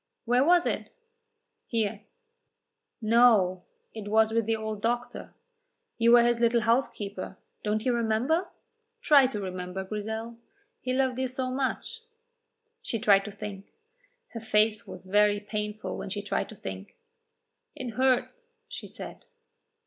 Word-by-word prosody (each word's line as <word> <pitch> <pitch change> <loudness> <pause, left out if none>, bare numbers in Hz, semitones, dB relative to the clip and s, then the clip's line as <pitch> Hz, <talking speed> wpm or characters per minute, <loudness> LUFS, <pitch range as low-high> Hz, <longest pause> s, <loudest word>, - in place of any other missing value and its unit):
"Where 245 +2 +3
was 350 +3 +4
it?" - - -2 0.8
"Here." 220 -3 -1 1.0
"No, 215 -5 +4 0.3
it 215 -2 -7
was 220 +1 +3
with 225 -1 0
the 225 - +2
old 220 -1 -5
doctor. 240 +2 -3 0.6
You 230 +1 +5
were 240 -1 +8
his 240 0 +2
little 235 0 +3
housekeeper; 210 -5 -1 0.3
don't 215 +1 -1
you 250 - +2
remember? 235 +9 +1 0.5
Try 285 - +6
to 250 -5 -5
remember, 185 0 -5
Grizel; 220 +3 -5 0.4
he 255 - -3
loved 260 -1 +1
you 260 - 0
so 255 0 -3
much." 275 - -3 0.8
She 245 - -2
tried 200 -3 +4
to 210 - -6
think. 200 -1 -8 0.6
Her 230 - -7
face 215 -1 +1
was 185 0 -10
very 205 +1 +3
painful 210 -1 -4
when - - -5
she 205 +1 -4
tried 205 - -2
to - - -10
think. - - -8 0.8
"It 255 - -5
hurts," 260 - +1 0.3
she - - -7
said. - - -10
220 Hz, 140 wpm, -28 LUFS, 210-245 Hz, 1.0 s, were